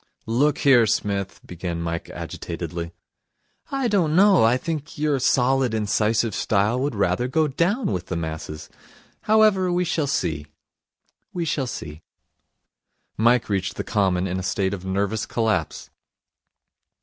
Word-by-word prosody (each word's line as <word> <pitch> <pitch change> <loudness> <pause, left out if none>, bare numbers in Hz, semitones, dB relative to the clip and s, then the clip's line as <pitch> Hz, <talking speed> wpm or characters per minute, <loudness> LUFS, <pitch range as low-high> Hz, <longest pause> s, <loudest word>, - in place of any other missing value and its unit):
'Look 135 +6 +2
here, 125 -5 +5
Psmith 100 -2 -1
' - - -20
began 85 -1 -5
Mike 85 0 -4
agitatedly. 85 -1 -6 0.8
'I 270 -2 -1
don't 175 -7 +2
know. 195 - +6
I 115 +3 +4
think 155 +2 -5
your 150 -2 +1
solid, 130 -2 +2
incisive 110 +1 +1
style 105 +6 +1
would 140 -2 -1
rather 100 +4 +1
go 155 +4 +1
down 180 - 0
with 90 -2 -3
the 90 - -3
masses. 80 -2 -5 0.6
However, 215 -4 +4
we 180 +1 +1
shall 160 -3 0
see, 75 - -2 0.9
we 175 -2 -2
shall 140 -4 -1
see.' 80 -8 -7 1.1
Mike 120 +2 +3
reached 95 -2 -2
the - - -3
Common 95 -3 +1
in 95 0 -2
a - - -4
state 95 +1 -1
of 95 -2 -6
nervous 100 +3 -1
collapse. 110 -9 -1
110 Hz, 140 wpm, -23 LUFS, 95-150 Hz, 1.1 s, know